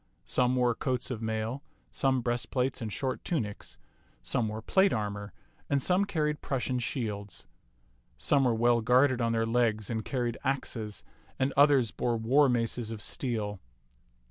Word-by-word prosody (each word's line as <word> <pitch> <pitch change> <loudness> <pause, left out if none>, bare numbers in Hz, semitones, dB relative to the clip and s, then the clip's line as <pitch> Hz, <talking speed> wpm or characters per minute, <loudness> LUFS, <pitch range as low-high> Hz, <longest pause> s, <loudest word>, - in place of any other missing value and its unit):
Some 125 0 +2
wore 125 -1 +3
coats 130 +2 -2
of 115 -3 -4
mail, 110 +4 -2 0.3
some 130 -2 +1
breastplates 125 +2 -1
and 110 -2 -4
short 130 +7 -3
tunics; 110 -12 -3 0.5
some 115 -3 0
wore 110 +1 -5
plate 190 - +4
armor, 105 -2 -3 0.4
and 140 - +2
some 185 +7 +2
carried 150 -5 -1
Prussian 130 -1 -1
shields. 105 -5 -4 0.7
Some 140 -2 +2
were 120 -2 +3
well 120 +1 +3
guarded 125 +2 +4
on 115 0 +1
their 115 0 +1
legs 115 -2 +1
and 110 -1 -2
carried 120 -1 -2
axes, 115 -6 -3 0.3
and 130 +1 0
others 140 -5 +5
bore 120 -1 -1
war 130 +6 +4
maces 115 -1 -1
of 115 -1 -5
steel. 105 -3 -3
120 Hz, 150 wpm, -29 LUFS, 110-130 Hz, 0.7 s, others